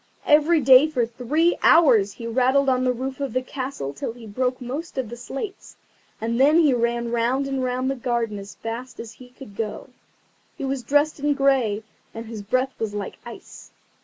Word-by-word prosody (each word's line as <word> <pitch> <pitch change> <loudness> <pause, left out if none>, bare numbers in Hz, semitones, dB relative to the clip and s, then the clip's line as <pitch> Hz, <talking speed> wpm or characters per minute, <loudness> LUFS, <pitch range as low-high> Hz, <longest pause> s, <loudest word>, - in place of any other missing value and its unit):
Every 305 +2 +4
day 265 +2 +7
for 255 -7 0
three 260 +9 0
hours 235 -12 +5
he 230 - -9
rattled 260 +4 +2
on 255 -1 +1
the 255 - +2
roof 260 +2 -5
of 275 -2 -3
the 255 0 0
castle 255 - -5
till 140 +10 -5
he 235 -1 -13
broke 250 +4 -2
most 275 +7 -6
of 255 -5 -2
the 240 - -7
slates, 275 - -7 0.4
and 230 +2 -2
then 295 +4 +5
he 305 -5 +4
ran 235 0 -1
round 240 +4 0
and 270 -1 -2
round 255 +1 -1
the - - -2
garden 235 -4 -2
as 195 -1 -10
fast 230 +4 -7
as 230 -1 -7
he 250 +2 -15
could 250 -5 -13
go. 215 +4 -5 0.7
He - - -4
was 270 -1 -2
dressed 290 +4 +1
in 290 0 +1
grey, 260 -7 +1 0.3
and 225 +1 -6
his 220 -2 -7
breath 255 +6 -1
was 215 -2 -3
like 205 - -5
ice. - - -12
255 Hz, 195 wpm, -23 LUFS, 230-275 Hz, 0.7 s, day